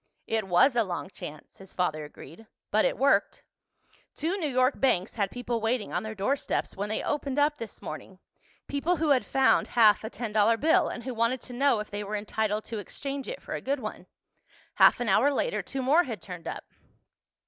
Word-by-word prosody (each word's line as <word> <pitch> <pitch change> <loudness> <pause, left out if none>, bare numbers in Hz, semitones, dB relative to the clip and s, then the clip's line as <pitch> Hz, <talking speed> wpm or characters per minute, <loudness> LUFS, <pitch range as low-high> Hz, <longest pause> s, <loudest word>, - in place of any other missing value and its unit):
"It 220 -3 -1
was 185 +9 +4
a 235 - +4
long 185 0 -5
chance," 155 -6 -10
his 190 -1 -13
father 155 -4 -1
agreed. 160 +7 -12 0.2
"But 215 +1 +3
it - - 0
worked. 275 +3 +2 0.7
Two 330 +5 -1
New 320 -6 -1
York 255 +1 +2
banks 195 -8 +1
had 200 -4 -1
people 240 -1 -3
waiting 225 0 -1
on - - 0
their 220 0 -6
doorsteps 240 +8 -1
when 205 +2 -3
they 215 - -2
opened 280 -2 -2
up 295 +1 +2
this 225 -3 -8
morning—people 200 - -5
who 315 -1 0
had 270 -3 +4
found 270 -1 +3
half 215 -3 +6
a 220 - -4
ten 230 -3 -5
dollar 215 +2 +4
bill 320 +6 +3
and 240 - -6
who 255 +1 -4
wanted 230 +3 +1
to 250 - -9
know 270 -2 +2
if 210 - -9
they 205 0 -3
were 205 +1 -4
entitled 215 0 -1
to 225 -2 -5
exchange 275 +7 -6
it - - -6
for - - -6
a - - -3
good 275 +1 -1
one. 215 -3 -7 0.7
Half - - +5
an 245 - -1
hour 220 +9 +4
later - - 0
two 270 -1 -5
more 305 +7 +4
had 230 -5 -5
turned 180 -3 -9
up. - - -5
230 Hz, 205 wpm, -28 LUFS, 205-275 Hz, 0.7 s, half